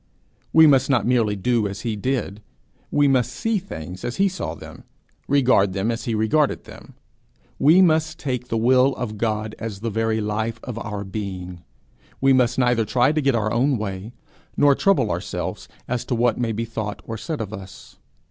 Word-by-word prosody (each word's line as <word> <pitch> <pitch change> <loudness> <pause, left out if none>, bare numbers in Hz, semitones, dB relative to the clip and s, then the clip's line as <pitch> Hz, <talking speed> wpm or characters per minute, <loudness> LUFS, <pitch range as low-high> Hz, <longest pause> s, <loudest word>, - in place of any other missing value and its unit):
We 160 0 +7
must 135 -3 +4
not 125 -7 +2
merely 115 -4 +2
do 110 +2 +1
as 100 0 -6
he 115 -3 -2
did; 110 -2 -2 0.5
we 145 -1 +3
must 125 -3 +2
see 215 - -1
things 90 - -8
as 120 - -3
he 195 - +3
saw 190 0 -4
them, - - -12 0.4
regard 125 -9 +3
them 100 +4 0
as 115 0 -4
he 115 - -1
regarded 120 +8 +1
them; - - -14 0.6
we 165 +7 +6
must 160 -2 +2
take 125 -3 -3
the 115 - -1
will 130 +3 +4
of 110 -4 -5
God 110 -1 -1
as 105 -3 -6
the 115 0 -2
very 110 0 0
life 110 +2 -2
of 120 -2 -5
our 105 -3 -5
being; 95 -3 -6 0.6
we 135 0 +4
must 125 -2 +2
neither 125 -3 +2
try 125 +5 +2
to 155 0 0
get 135 -3 +2
our 110 -1 0
own 130 +3 +2
way, 100 0 -5 0.5
nor 145 -1 +5
trouble 195 +7 +2
ourselves - - -4 0.2
as 125 -1 -2
to 125 - -1
what 120 0 +1
may 120 -2 0
be 115 +2 -2
thought 110 -2 -5
or 115 - -5
said 155 +7 -5
of 110 -2 -5
us. 95 -3 -11
115 Hz, 190 wpm, -22 LUFS, 105-135 Hz, 0.6 s, We